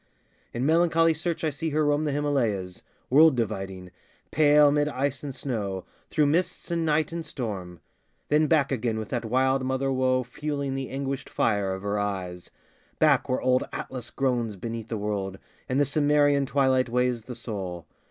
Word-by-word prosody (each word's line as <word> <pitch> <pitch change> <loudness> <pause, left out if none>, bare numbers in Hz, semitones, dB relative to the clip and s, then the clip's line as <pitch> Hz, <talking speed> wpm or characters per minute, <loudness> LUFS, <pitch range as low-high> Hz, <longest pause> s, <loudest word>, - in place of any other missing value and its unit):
In 120 +2 -2
melancholy 165 +1 +4
search 165 +2 -3
I 155 - +1
see 155 +4 -3
her 155 0 +1
roam 145 +1 +2
The 150 - 0
Himalayas, 120 -11 -1 0.3
world 155 +1 +7
dividing, 95 -5 -3 0.4
pale 150 -1 +5
'Mid 145 0 +2
ice 140 -1 -2
and 140 -3 -6
snow, 105 -9 -3 0.2
through 150 - +2
mists 170 +4 0
and 170 -1 0
night 155 -1 +1
and 170 0 -4
storm; 95 - -6 0.5
Then 150 +1 +3
back 150 -4 +2
again 115 -3 -1
with 110 -1 -5
that 120 -3 -2
wild 130 +3 +2
mother 130 +1 0
woe 130 -1 +2
Fueling 140 +2 -3
the 135 -1 -4
anguished 135 0 -4
fire 100 -3 +1
of 95 +1 -5
her 100 0 -1
eyes, 95 -3 -4 0.5
Back - - +3
where 130 - 0
old 130 0 +3
Atlas 125 -3 -6
groans 120 -5 -1
beneath 115 +3 -6
the 115 - -2
world, 100 -2 -3 0.3
And 130 +2 +1
the 145 - +4
Cimmerian 145 -1 +3
twilight 130 -2 +2
weighs 125 -2 0
the 125 - -7
soul. 95 -7 -5
130 Hz, 170 wpm, -26 LUFS, 110-145 Hz, 0.5 s, world